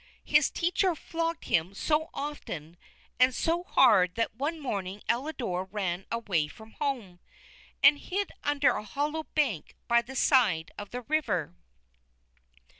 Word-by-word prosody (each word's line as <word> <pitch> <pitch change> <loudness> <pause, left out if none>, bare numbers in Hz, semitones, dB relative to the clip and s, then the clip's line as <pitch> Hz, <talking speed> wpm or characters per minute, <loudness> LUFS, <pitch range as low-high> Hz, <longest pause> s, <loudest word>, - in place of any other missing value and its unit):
His - - +4
teacher 360 +1 +1
flogged 330 +1 -3
him 170 +4 +1
so 310 +7 0
often 175 - -6 0.4
and 255 0 +5
so 340 +1 0
hard 200 - +4
that 230 0 -1
one 290 +8 -3
morning 200 -7 -4
Elidore 235 - -1
ran 190 -2 -3
away 195 -10 0
from 220 +8 -14
home, 240 -12 -3 0.6
and 285 +1 +7
hid 395 +2 -3
under 290 -2 +3
a - - -3
hollow 295 +8 -2
bank 260 - 0
by 235 0 +4
the 255 +3 -10
side 215 - +3
of 205 -1 -8
the 250 - -5
river. 220 - -1
245 Hz, 135 wpm, -29 LUFS, 190-300 Hz, 0.6 s, and